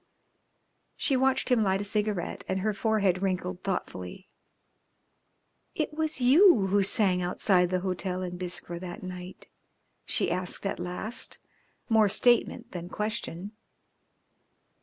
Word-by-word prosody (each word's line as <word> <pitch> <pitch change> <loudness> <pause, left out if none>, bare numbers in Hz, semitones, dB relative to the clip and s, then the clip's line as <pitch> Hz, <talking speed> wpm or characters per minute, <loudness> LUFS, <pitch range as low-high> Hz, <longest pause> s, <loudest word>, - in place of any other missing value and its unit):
She 275 - 0
watched 265 +1 +2
him 250 -3 +3
light 190 -2 +1
a - - -2
cigarette, 210 -3 -1
and 190 0 -1
her 215 +2 0
forehead 200 -4 +1
wrinkled 185 -1 -2
thoughtfully. 180 - -5 1.5
"It 310 -1 -2
was 315 -1 -1
you 265 - +6
who 200 +1 +2
sang 195 -2 +3
outside 180 0 +2
the 185 0 0
hotel 185 0 -2
in 180 -1 -5
Biskra 175 -1 -3
that 175 0 -8
night?" 180 0 -8 0.6
she - - +2
asked 180 +2 -3
at 195 - -2
last, 180 +6 -4 0.5
more 220 -3 +4
statement 240 +2 +2
than 175 -1 -6
question. 210 -3 -4
195 Hz, 125 wpm, -28 LUFS, 180-220 Hz, 1.5 s, you